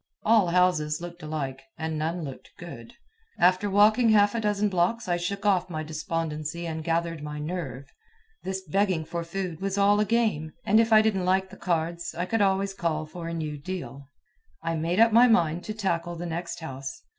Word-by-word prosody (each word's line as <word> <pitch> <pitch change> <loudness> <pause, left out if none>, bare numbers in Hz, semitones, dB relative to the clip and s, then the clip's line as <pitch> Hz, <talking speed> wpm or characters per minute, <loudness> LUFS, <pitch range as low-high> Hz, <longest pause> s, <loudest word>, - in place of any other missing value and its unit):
All 220 -4 +4
houses 170 -4 +2
looked 175 0 -8
alike, 140 -4 -4 0.2
and 160 0 -3
none 165 +2 -2
looked 135 -3 -8
"good." 165 -11 -10 0.4
After 185 +3 +3
walking 215 +4 +5
half 205 -1 +5
a 230 - -1
dozen 210 -1 +1
blocks 190 +4 0
I 175 - +2
shook 195 +4 -4
off 185 -3 +2
my 155 -2 -4
despondency 155 +1 -3
and 160 -1 -4
gathered 165 -1 -1
my 150 0 -6
"nerve." 150 -4 -5 0.6
This 190 0 -4
begging 185 -1 +1
for 170 +1 -4
food 175 -1 -5
was 195 0 -2
all 200 +1 +4
a 210 - +3
game, 205 -9 0
and 215 +3 +5
if 230 0 +2
I 215 0 +7
didn't 195 -4 +1
like 190 +1 +1
the - - -10
cards, 170 -1 -2
I 175 - -1
could 225 +3 0
always 195 0 +2
call 160 -4 -2
for 165 +2 -8
a 170 - -4
new 155 -2 -4
deal. 140 -5 -7 0.5
I 165 0 -1
made 165 +4 -1
up 230 0 +6
my 235 +3 +7
mind 175 -7 +2
to 215 - -4
tackle 175 -5 -1
the 170 +1 -5
next 170 +1 -4
house. 135 +6 -7
175 Hz, 195 wpm, -26 LUFS, 160-200 Hz, 0.6 s, I